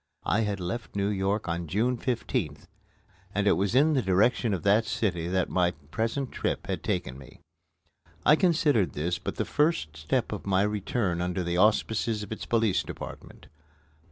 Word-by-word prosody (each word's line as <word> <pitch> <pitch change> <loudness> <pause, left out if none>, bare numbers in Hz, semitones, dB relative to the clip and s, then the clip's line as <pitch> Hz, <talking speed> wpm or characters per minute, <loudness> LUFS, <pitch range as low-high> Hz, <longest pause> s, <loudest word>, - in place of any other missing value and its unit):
I 105 - +2
had 105 -3 -1
left 100 +7 -5
New 100 0 +1
York 100 0 -1
on 85 0 -2
June 115 +9 +1
15th, 120 -1 -2 0.7
and 100 0 +1
it 100 - +5
was 100 +4 +1
in 150 +4 +5
the 135 - +2
direction 110 +4 +2
of 90 -5 -2
that 105 +3 +4
city 110 -7 -1
that 95 0 +1
my 90 -1 +1 0.2
present 115 - -1
trip - - -2
had - - -3
taken 65 +1 -2
me. 65 - -14 0.9
I 150 - +7
considered 155 - +2
this 85 +4 -2
but - - -4
the - - -1
first 150 - 0
step 75 +1 -1
of - - -6
my 95 0 +3
return 105 -3 -1
under 90 +1 -1
the 85 0 -1
auspices 110 +2 +2
of 105 - -10
its 110 - -5
Police 115 -4 +2
Department. - - -9
100 Hz, 175 wpm, -28 LUFS, 90-115 Hz, 0.9 s, I